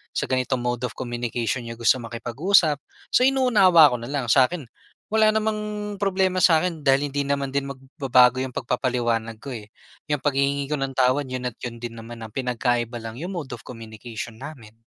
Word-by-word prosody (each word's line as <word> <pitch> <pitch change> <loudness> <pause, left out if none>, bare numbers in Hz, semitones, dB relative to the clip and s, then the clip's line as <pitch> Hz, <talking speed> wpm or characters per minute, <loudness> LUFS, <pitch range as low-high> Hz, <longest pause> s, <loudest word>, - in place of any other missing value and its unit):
sa - - 0
ganitong 130 0 0
mode 120 0 -2
of - - -12
communication 120 0 -3
niya 115 - -6
gusto 120 +2 +3
makipag-usap. 140 - +1 0.3
So, - - +5
inuunawa 200 - +6
ko - - -1
na 120 - -6
lang. 140 -3 -2
Sa'kin, 140 +5 +3 0.5
wala 220 0 +4
namang 215 0 0 0.4
problema 190 -2 +1
sa 165 -2 +6
akin 175 -3 -2
dahil 135 +2 +4
hindi 145 +1 -1
naman 140 -1 -1
din 140 0 -1
magbabago 130 -2 +2
'yong 130 -1 -5
pagpapaliwanag 120 -3 -1
ko 140 - -6
eh. 110 -3 -8 0.4
'Yang 145 -2 -1
paghihingi 140 0 +1
ko - - +2
ng 135 -1 -3
tawad, 130 +2 +2
'yon 125 -1 -3
at 110 - -27
'yon 120 -1 -6
din 115 -1 -6
naman. 115 0 -9
Ang 110 - -9
pinagkaiba 120 -2 -1
lang 115 +2 -7
'yong 180 +5 -5
mode 155 -7 -5
of - - -14
communication 115 -1 -8
namin. 125 -7 -10
130 Hz, 185 wpm, -24 LUFS, 120-145 Hz, 0.5 s, inuunawa